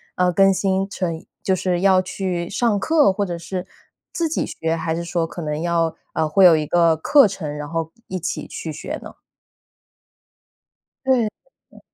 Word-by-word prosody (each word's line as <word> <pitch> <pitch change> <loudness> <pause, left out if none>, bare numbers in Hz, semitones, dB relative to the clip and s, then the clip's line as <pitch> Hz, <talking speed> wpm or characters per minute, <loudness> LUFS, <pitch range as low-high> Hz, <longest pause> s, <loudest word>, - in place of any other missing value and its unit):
呃， 180 0 +2
更 195 +2 +5
新 195 0 0
成 175 -4 -2
一 160 - -13 0.2
就 190 - +2
是 180 -1 -1
要 190 -1 +5
去 180 -2 -3
上 215 -1 +1
课 305 -4 +4
或 205 +1 -1
者 175 -2 -4
是 180 +2 -5 0.4
自 335 -1 -1
己 - - -1
学， 160 0 -2
还 160 0 -2
是 170 - -3
说 170 -1 -1
可 175 - -8
能 150 0 -3
要 170 -1 0 0.2
呃， 155 - +1
会 190 +4 +5
有 170 -2 +8
一 155 -1 0
个 170 0 +3
课 280 - +5
程， 155 -7 -5
然 150 0 -5
后 165 -1 -3 0.2
一 185 - -6
一 - - -1
起 175 - -4
去 - - -6
学 - - -6
呢？ - - -10 1.9
对， 250 -4 +3 0.4
呃。 - - -17
180 Hz, 200 characters per minute, -21 LUFS, 165-195 Hz, 1.9 s, 有